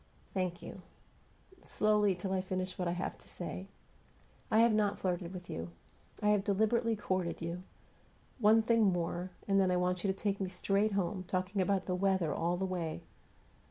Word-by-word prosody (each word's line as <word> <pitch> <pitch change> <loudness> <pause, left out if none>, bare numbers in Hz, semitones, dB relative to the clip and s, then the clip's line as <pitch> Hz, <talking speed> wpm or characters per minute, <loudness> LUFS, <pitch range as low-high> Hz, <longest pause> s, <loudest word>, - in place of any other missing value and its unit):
Thank 180 -2 -2
you. 190 - -8 0.8
Slowly, 210 -2 +2
till 190 +2 -3
I 190 - +1
finish 185 0 -3
what 180 - 0
I 170 - 0
have 180 +1 -4
to - - -17
say. 185 +2 -6 0.8
I 220 - +5
have 230 -1 +5
not 210 -1 +2
flirted 180 -2 -2
with 180 -2 -8
you. 85 +1 -5 0.5
I 210 - +4
have 210 -2 +3
deliberately 220 +3 +2
courted 185 -4 -2
you. 170 +1 -4 0.8
One 220 0 +5
thing 230 0 +3
more, 175 +1 -2 0.2
and 195 -1 +4
then 190 - +3
I 180 - +2
want 180 0 0
you 195 - +2
to 190 - -7
take 200 -1 -1
me 190 - -1
straight 200 +3 +1
home, 190 -1 -1
talking 185 +2 -1
about 190 0 +1
the 180 - -1
weather 185 -4 +1
all 175 +2 0
the 190 - -1
way. 175 -4 -3
190 Hz, 185 wpm, -33 LUFS, 180-205 Hz, 0.8 s, I